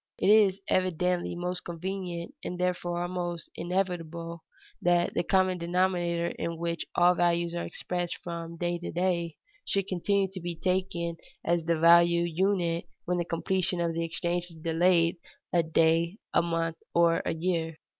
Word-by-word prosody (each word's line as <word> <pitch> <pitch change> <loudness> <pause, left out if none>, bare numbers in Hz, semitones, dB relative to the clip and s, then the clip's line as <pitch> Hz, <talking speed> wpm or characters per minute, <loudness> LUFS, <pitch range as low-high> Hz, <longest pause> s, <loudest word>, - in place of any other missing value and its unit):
It 200 - +3
is 200 -3 +5
evidently 180 -1 +1
most 180 +1 -3
convenient, 180 +3 -5
and 180 - -4
therefore 175 -1 -1
almost 175 -1 -4
inevitable, 170 -2 -3 0.4
that 175 0 +2
the - - +1
common 185 0 +2
denominator 175 -1 +1
in 170 0 -2
which 170 0 -3
all 175 +1 +6
values 170 -1 +1
are 170 - -2
expressed 175 -1 -3
from 170 -1 -6
day 175 0 -1
to 175 - -5
day 170 -2 0 0.3
should 195 -1 0
continue 195 +2 +1
to 190 -1 -7
be 175 0 -4
taken 175 -1 -1 0.3
as 170 -1 +1
the 170 0 +2
value 170 +1 +6
unit 170 0 0 0.2
when 180 0 0
the 175 - -1
completion 180 +1 -1
of 170 -1 0
the 165 0 -1
exchange 170 +1 -1
is 165 - -13
delayed 165 +2 +2 0.4
a 175 - +5
day, 165 +3 +2 0.2
a - - +5
month, 165 -1 -1 0.2
or 170 -1 +4
a 165 - -1
year. 165 -1 -1
175 Hz, 155 wpm, -28 LUFS, 170-180 Hz, 0.4 s, all